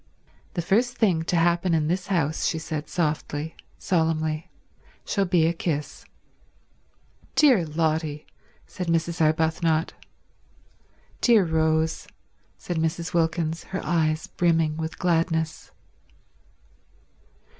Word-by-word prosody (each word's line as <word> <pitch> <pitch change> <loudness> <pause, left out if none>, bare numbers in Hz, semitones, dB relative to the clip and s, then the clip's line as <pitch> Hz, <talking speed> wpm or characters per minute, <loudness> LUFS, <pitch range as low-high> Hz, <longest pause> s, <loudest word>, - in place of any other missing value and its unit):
"The 175 - -1
first 240 +8 +1
thing 185 -8 +2
to 175 - 0
happen 170 +1 +2
in 155 -2 +1
this 180 +2 -1
house," 160 -5 0
she - - -1
said 155 -1 -5
softly, 155 -2 -2 0.2
solemnly, 160 -3 0 0.6
"shall 200 -1 0
be 175 -3 +3
a 165 - +2
kiss." 155 -3 -4 1.3
"Dear 245 - +5
Lotty," 155 -1 -1 0.4
said 180 - -6
Mrs. 165 +1 0
Arbuthnot. 160 +1 +1 1.3
"Dear 225 -6 +5
Rose," 160 0 0 0.5
said 175 - -4
Mrs. 165 +2 -2
Wilkins, 165 -1 0
her 190 - -4
eyes 155 -2 +1
brimming 165 -3 +1
with 160 0 -5
gladness. 165 -2 0
165 Hz, 105 wpm, -25 LUFS, 160-175 Hz, 1.3 s, Dear